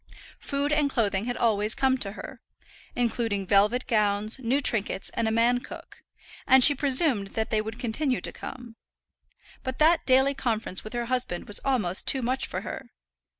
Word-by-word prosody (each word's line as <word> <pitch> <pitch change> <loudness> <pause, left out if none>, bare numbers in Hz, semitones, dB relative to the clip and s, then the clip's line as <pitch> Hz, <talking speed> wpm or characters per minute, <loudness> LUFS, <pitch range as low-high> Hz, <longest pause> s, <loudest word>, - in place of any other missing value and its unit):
Food 285 +1 -2
and 295 -1 +1
clothing 210 -5 -1
had 245 0 -4
always 215 -1 +1
come 265 -1 +1
to 200 -4 -3
her, - - -10 0.5
including 225 -4 -2
velvet 210 +6 +2
gowns, 215 0 0
new 260 +2 0
trinkets, 215 -7 +1
and 230 - -2
a - - 0
man 235 +2 +2
cook, - - -12 0.5
and 265 0 +6
she 290 - +9
presumed 270 - +3
that 220 - -2
they 215 -1 +1
would 220 +1 -7
continue 250 +3 -1
to - - -3
come. 240 -3 -10 0.8
But 260 0 -5
that 325 +2 +2
daily 265 +1 +4
conference 225 -7 -3
with 215 - -10
her 240 0 -3
husband 245 -8 -3
was 205 - +3
almost 210 -10 -1
too 265 -2 +2
much 255 +3 -1
for - - -5
her. - - -8
240 Hz, 175 wpm, -26 LUFS, 215-265 Hz, 0.8 s, she